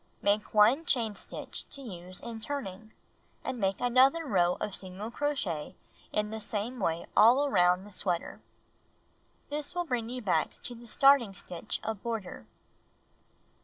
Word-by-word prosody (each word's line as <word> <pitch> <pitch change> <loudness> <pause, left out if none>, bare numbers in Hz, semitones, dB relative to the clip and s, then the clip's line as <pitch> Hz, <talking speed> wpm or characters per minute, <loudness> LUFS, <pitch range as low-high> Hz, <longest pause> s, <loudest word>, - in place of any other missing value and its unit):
Make 205 +1 +2
1 230 +10 +5
diain 230 -9 +1
stitch - - -5
to 280 - -3
use 180 -5 -8
in 230 -1 -6
turning, 220 -5 -5 0.5
and 260 -2 -3
make 195 -2 0
another 260 +6 +4
row 180 -8 +3
of 205 - -3
single 195 +4 -7
crochet 235 - -2 0.4
in 210 0 -1
the 220 0 -5
same 220 +4 -4
way 170 -4 -1
all 245 +7 +7
around 180 -5 +3
sweater. 180 -2 -2 1.1
This 295 +2 -3
will 350 0 0
bring 245 -6 -2
you 250 0 -5
back 165 -6 0
to 245 - -4
the 235 0 -12
starting 265 -5 +5
stitch 180 -2 -5
of 220 -3 -3
border. 215 - -5
220 Hz, 145 wpm, -30 LUFS, 190-255 Hz, 1.1 s, all